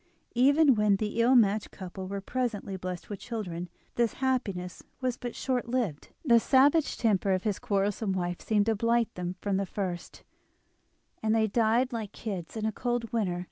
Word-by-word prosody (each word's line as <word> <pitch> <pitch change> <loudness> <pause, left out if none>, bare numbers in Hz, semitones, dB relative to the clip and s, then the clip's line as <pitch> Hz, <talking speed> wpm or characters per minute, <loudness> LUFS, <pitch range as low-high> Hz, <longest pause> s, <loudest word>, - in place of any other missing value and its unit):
Even 280 +4 +5
when 210 -2 +3
the 215 +3 -1
ill 250 +3 +5
matched 210 -3 +3
couple 190 0 -7
were 200 +1 -4
presently 220 -3 -2
blessed 180 -1 -5
with 205 - -6
children, 180 -7 -5 0.3
his 235 -2 +2
happiness 210 -9 -2 0.2
was 255 -2 -1
but 245 -1 -6
short 250 -2 -1
lived, 230 - -1 0.2
the 235 -4 +6
savage 280 +6 +4
temper 200 -4 +2
of 185 - -1
his 210 -3 -1
quarrelsome 200 0 0
wife 175 -1 -2
seemed 210 -2 +2
to 225 - +2
blight 230 +2 +1
them 180 0 -4
from 200 -2 0
the 195 - 0
first, 180 -3 -5 1.0
and 220 0 +2
they 220 -1 +3
died 230 +4 +2
like 220 -3 -5
little 220 -3 -3
kids 170 - -12
in 215 - -2
a 220 - +1
cold 240 0 -2
winter. 190 -6 0
215 Hz, 180 wpm, -29 LUFS, 195-240 Hz, 1.0 s, the